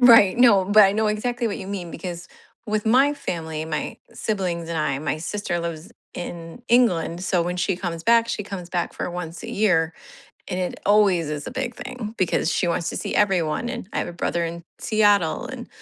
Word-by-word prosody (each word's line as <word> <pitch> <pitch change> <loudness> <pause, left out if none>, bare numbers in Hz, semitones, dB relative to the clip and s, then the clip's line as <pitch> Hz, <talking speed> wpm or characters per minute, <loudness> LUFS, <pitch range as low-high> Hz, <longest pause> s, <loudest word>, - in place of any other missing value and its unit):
Right. 230 -6 +7
No, 230 -6 +6
but 205 +2 +7
I 195 - +4
know 220 +1 +1
exactly 240 +3 -1
what 210 - -3
you 190 - -7
mean 190 -4 -5
because, 170 0 -6 0.4
with 215 -1 -1
my 265 +6 +4
family, 160 - -4
my 155 -1 -3 0.2
siblings 180 -6 -2
and 170 - -3
I 145 -3 0
my 150 +1 -2
sister 175 +2 -3
lives 170 -1 -5 0.2
in 170 +2 -7
England, 185 -7 +2
so 180 -2 +2
when 180 +1 -2
she 180 +1 0
comes 170 -3 -4
back, 230 0 +4
she 235 - -2
comes 190 -3 -7
back 175 -1 -2
for - - -4
once 170 -1 -6
a - - -6
year, 175 -6 +2 0.5
and 180 - -2
it 180 -1 -3
always 200 -6 +4
is 150 -1 -4
a - - -4
big 255 -2 -3
thing, 230 -4 -6
because 180 -2 +1
she 185 - +1
wants 170 0 0
to - - -5
see - - -3
everyone, 190 +1 +1
and 240 -6 -5
I - - -2
have - - -1
a - - -6
brother 170 0 -1
in 170 0 -7
Seattle 205 -6 +2
and, - - -8
185 Hz, 210 wpm, -23 LUFS, 170-215 Hz, 0.5 s, Right